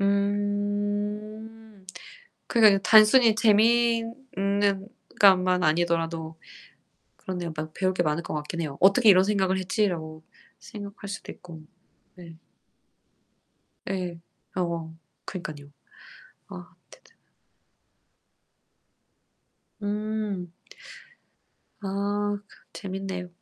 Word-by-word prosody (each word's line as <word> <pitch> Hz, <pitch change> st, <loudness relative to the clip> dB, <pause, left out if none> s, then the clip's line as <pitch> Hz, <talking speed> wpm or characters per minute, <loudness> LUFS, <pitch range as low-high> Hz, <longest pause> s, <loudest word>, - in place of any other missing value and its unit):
음. 205 Hz, +1 st, -2 dB, 0.6 s
그러니까 220 Hz, -3 st, +6 dB
이거 -, -, +1 dB
단순히 220 Hz, +3 st, +6 dB
재미있는 220 Hz, -3 st, +1 dB, 0.3 s
것만 185 Hz, -2 st, +5 dB
아니더라도 165 Hz, 0 st, 0 dB, 0.8 s
그런데 180 Hz, -2 st, -5 dB
막 155 Hz, 0 st, -5 dB
배울 185 Hz, 0 st, 0 dB
게 180 Hz, -, +1 dB
많을 155 Hz, 0 st, -1 dB
거 -, -, -6 dB
같긴 150 Hz, +3 st, -4 dB
해요. 150 Hz, -4 st, -4 dB
'어떻게 200 Hz, +5 st, +5 dB
이런 185 Hz, -2 st, +7 dB
생각을 190 Hz, -2 st, +1 dB
했지.'라고 175 Hz, -5 st, -2 dB, 0.4 s
생각할 205 Hz, -1 st, -9 dB
수도 200 Hz, -, -7 dB
있고, 165 Hz, -3 st, -13 dB, 0.5 s
네. 170 Hz, -3 st, -13 dB, 1.5 s
예. 180 Hz, -3 st, -4 dB, 0.3 s
아 185 Hz, -, -1 dB
뭐. 165 Hz, -2 st, -4 dB, 0.3 s
그니깐요 150 Hz, -6 st, -8 dB, 0.8 s
아, 180 Hz, 0 st, -11 dB, 0.2 s
대단 -, -, -20 dB, 2.7 s
음. 205 Hz, -3 st, -3 dB, 1.3 s
아 205 Hz, +1 st, -1 dB
그 -, -, -19 dB
재밌네요. 190 Hz, -2 st, -5 dB
195 Hz, 185 characters per minute, -26 LUFS, 175-210 Hz, 2.7 s, 이런